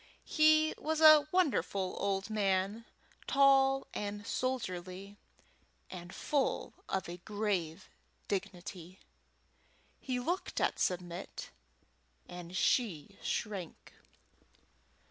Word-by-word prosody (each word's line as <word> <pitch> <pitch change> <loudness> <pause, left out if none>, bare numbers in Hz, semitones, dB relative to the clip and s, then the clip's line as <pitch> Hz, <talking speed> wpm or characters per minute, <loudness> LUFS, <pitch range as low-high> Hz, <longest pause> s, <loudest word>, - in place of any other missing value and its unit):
He 310 0 +4
was 315 +1 -1
a 310 -2 +8
wonderful 255 - +1
old 200 +1 -1
man, 200 +1 0 0.4
tall 270 -1 +4
and 205 0 -4
soldierly, 200 -6 -3 0.7
and 175 -1 -8
full 280 +5 -1 0.2
of 190 -1 -1
a 175 +1 -6
grave 190 -4 -2 0.4
dignity. 185 -2 -5 1.0
He 255 -2 -2
looked 345 +9 -2
at - - 0
Submit, 175 -1 -3 0.8
and 175 +1 -7
she 200 - 0
shrank. 195 -7 -4
200 Hz, 85 wpm, -33 LUFS, 185-270 Hz, 1.0 s, a